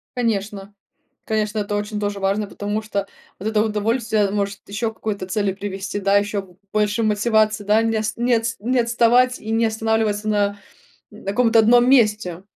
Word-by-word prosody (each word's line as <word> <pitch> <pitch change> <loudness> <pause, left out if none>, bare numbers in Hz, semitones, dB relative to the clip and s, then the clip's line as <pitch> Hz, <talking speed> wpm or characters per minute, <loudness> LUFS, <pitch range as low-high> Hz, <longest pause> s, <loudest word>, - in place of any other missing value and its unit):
Конечно, 205 -4 -2 0.5
конечно, 215 0 -1
это 205 0 -2
очень 210 +1 -3
тоже 205 -1 -3
важно. 200 +2 0
Потому 205 +1 -3
что 200 -2 -3 0.3
вот 205 +4 -3
это 215 -1 +2
удовольствие 220 0 0
может 200 -1 -2
ещё 220 +3 -2
к - - -21
какой-то 200 -4 -4
цели 200 +1 0
привести, 195 0 -5
да. 200 0 +2
Ещё 205 0 -1
б 185 -2 -18 0.2
больше 210 +1 +1
мотивации, 215 0 +1
да 210 +2 +4
не 225 -1 0
ост 215 0 -3
не 240 +1 +1
отс 230 0 -1
не 245 +5 0
отставать, 240 +2 +3
и 220 - -6
не 225 +1 +2
останавливаться 220 -1 0
на 205 -1 +1 0.5
н 210 - -14
каком-то 225 +3 +3
одном 240 +3 +5
месте. 210 -8 +2
215 Hz, 175 wpm, -21 LUFS, 205-225 Hz, 0.5 s, одном